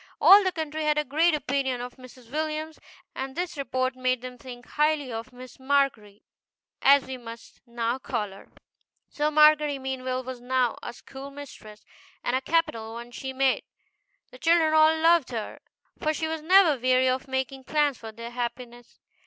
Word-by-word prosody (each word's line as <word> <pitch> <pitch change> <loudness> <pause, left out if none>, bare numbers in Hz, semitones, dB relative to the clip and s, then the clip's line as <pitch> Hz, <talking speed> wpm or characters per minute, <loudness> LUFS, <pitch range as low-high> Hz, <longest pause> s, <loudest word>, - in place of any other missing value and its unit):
All 405 +1 +8
the 375 - +1
country 315 -2 -4
had 300 0 +2
a 300 - +2
great 315 +4 +2
opinion 270 -3 -1
of 245 +2 -7
Mrs. 255 -2 -15
Williams, 310 +1 -3 0.3
and 265 0 -5
this 355 0 -3
report 260 -2 -2
made 255 -1 0
them 250 0 -7
think 245 -1 -11
highly 300 -3 0
of 225 +3 -6
Miss 250 0 -13
MARGERY, 260 -7 0 0.6
as 280 0 +5
we 260 0 -6
must 230 -1 -12
now 235 +1 -2
call 230 -6 -3
her. 195 - -14 0.6
So 300 0 0
Margery 300 -1 +5
Meanwell 260 -1 -3
was 255 -1 -7
now 250 -1 +1
a - - -6
schoolmistress, 270 -5 -11 0.4
and 245 - 0
a 260 - 0
capital 230 -8 -1
one 235 +1 -8
she 265 +2 -6
made. 265 0 +1 0.7
The 255 - -14
children 325 +1 +3
all 315 0 +5
loved 330 -3 +4
her, 225 -4 -5 0.4
for 310 0 0
she 320 - -2
was 320 0 -4
never 330 -5 +5
weary 255 0 +3
of 255 +2 -1
making 265 0 -3
plans 295 -4 +1
for 225 -1 -8
their 230 +2 -9
happiness. 240 0 -6
265 Hz, 170 wpm, -26 LUFS, 245-300 Hz, 0.7 s, All